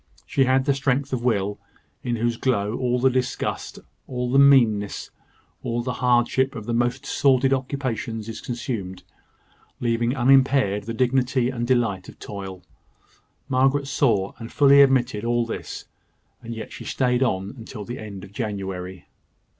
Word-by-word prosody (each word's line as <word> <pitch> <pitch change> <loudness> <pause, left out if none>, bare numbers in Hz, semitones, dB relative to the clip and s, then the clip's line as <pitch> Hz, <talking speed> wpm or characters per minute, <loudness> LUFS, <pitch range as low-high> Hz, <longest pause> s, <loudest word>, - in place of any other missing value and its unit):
She 135 - +2
had 130 +1 +2
the 140 - +3
strength 135 0 -1
of 120 -2 -2
will, 105 -4 0 0.4
in 120 - -2
whose 120 +1 0
glow 115 -4 0
all 125 -1 0
the 130 +1 +3
disgust, 125 0 -2 0.3
all 125 -1 -3
the 135 - +5
meanness, 120 -8 +4 0.5
all 120 0 -2
the 125 0 -2
hardship 125 +2 +2
of 110 -3 -6
the 120 - -2
most 120 +3 0
sordid 135 -1 +3
occupations 125 -5 -3
is 115 0 -6
consumed, 115 -7 -5 0.8
leaving 120 +1 0
unimpaired 130 -6 +3
the 115 0 -4
dignity 125 0 +1
and 120 -2 -3
delight 115 -7 0
of - - -14
toil. 95 -3 -8 0.8
Morris 135 +2 +1
saw 110 -9 +1
and 115 -1 -8
fully 140 -1 +6
admitted 130 -5 +3
all 120 0 +1
this; 115 - -6 0.6
and 115 0 -7
yet 110 - -7
she - - -8
stayed 125 -1 0
on 110 0 -1
till 105 -4 -8
the 120 - -6
end 100 -3 -8
of 100 0 -12
January. 95 -5 -5
120 Hz, 155 wpm, -23 LUFS, 110-130 Hz, 0.8 s, fully